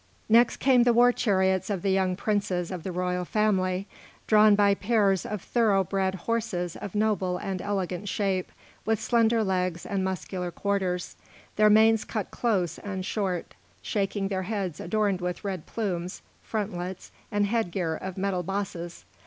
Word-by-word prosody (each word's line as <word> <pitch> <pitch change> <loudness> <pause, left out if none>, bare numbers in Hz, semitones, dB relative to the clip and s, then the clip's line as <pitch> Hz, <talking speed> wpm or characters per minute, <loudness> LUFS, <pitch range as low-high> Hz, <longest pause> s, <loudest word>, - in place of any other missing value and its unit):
Next 230 +2 +5
came 260 -2 +4
the 240 0 +4
war 245 +1 +6
chariots 190 -5 +1
of 195 -4 -2
the 195 - +2
young 190 -1 +1
princes 195 -3 -1
of 180 -2 -4
the 185 - -4
royal 180 0 -1
family, 190 -2 +1 0.4
drawn 215 -1 +6
by 200 -1 +4
pairs 200 -2 +1
of 210 -3 -4
thorough 215 -5 +2
bred 190 +1 -1
horses 215 -7 -1
of 200 0 -7
noble 205 -4 +1
and 185 0 -4
elegant 195 -1 -2
shape, 190 -3 -1 0.3
with 220 -1 +1
slender 230 0 +2
legs 185 -3 -1
and 195 -1 -1
muscular 185 -1 -3
quarters, 185 -1 -2 0.4
their 215 0 +5
manes 220 +1 +5
cut 215 -4 -4
close 195 -8 0
and 190 -2 -5
short, 190 -5 -2 0.3
shaking 195 -1 -1
their 190 -2 -1
heads 190 -4 -3
adorned 200 0 0
with 180 +2 -3
red 190 -5 -4
plumes, 185 -5 -3 0.2
frontlets, 190 -4 -4 0.2
and 205 0 +2
headgear 190 -6 -1
of 190 +3 -6
metal 190 -1 0
bosses. 180 -2 -5
195 Hz, 155 wpm, -27 LUFS, 180-215 Hz, 0.4 s, war